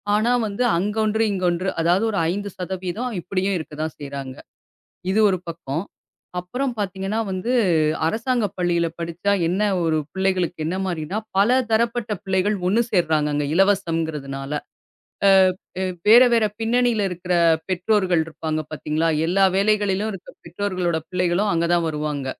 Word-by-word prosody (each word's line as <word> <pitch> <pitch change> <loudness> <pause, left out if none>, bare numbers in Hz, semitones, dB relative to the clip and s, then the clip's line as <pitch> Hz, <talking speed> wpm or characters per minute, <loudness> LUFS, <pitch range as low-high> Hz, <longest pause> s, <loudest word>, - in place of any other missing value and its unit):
ஆனா 220 +3 +2 0.2
வந்து, 205 +4 -2
அங்க 205 +4 -1
ஒன்று, 220 +1 +1
இங்க 185 -2 -2
ஒன்று. 180 +2 -1
அதாவது 175 +6 +2
ஒரு 200 - -1
5% 205 +2 -4
சதவீதம் 190 +6 -4
இப்படியும் 190 +2 -1
இருக்கத்தான் 155 0 -5
செய்யறாங்க. 140 -2 -6 0.8
இது 215 - +3
ஒரு 185 -2 -1
பக்கம். 165 0 -4 0.6
அப்புறம் 250 +8 -3
பாத்தீங்கன்னா 195 +2 -2
வந்து, 185 +6 -2 0.6
அரசாங்க 230 +4 0
பள்ளியில் 170 -2 0
படிச்சா 170 +4 -1 0.2
என்ன 190 +4 0 0.2
ஒரு 160 -1 +1 0.2
பிள்ளைகளுக்கு 185 -3 0
என்ன 180 - -2
மாரின்னா, 175 +3 -3 0.2
பல 245 +6 +4
தரப்பட்ட 230 0 +1
பிள்ளைகள் 190 +2 +1
ஒண்ணு 220 +5 +3
சேர்றாங்க, 155 -5 +2
அங்க 145 0 0
இலவசம்ங்கறதுனால! 160 -8 0 1.3
அ - - -1
வே 180 - -6
வேற 235 +4 +9
வேற 230 -2 +4
பின்னணியில 235 0 +2
இருக்கிற 180 0 -3 0.3
பெற்றோர்கள் 185 -2 +1
இருப்பாங்க. 155 -1 -3
பாத்தீங்களா, 155 +1 -1 0.2
எல்லா 190 +4 +2
வேலைகளிலும் 205 0 +1
இருக்கிற 195 -3 -9
பெற்றோர்களோட 180 -1 -2
பிள்ளைகளும் 180 +3 +1
அங்க 165 0 +1
தான் 170 -1 +2
வருவாங்க. 150 -3 -3
185 Hz, 135 wpm, -22 LUFS, 165-210 Hz, 1.3 s, வேற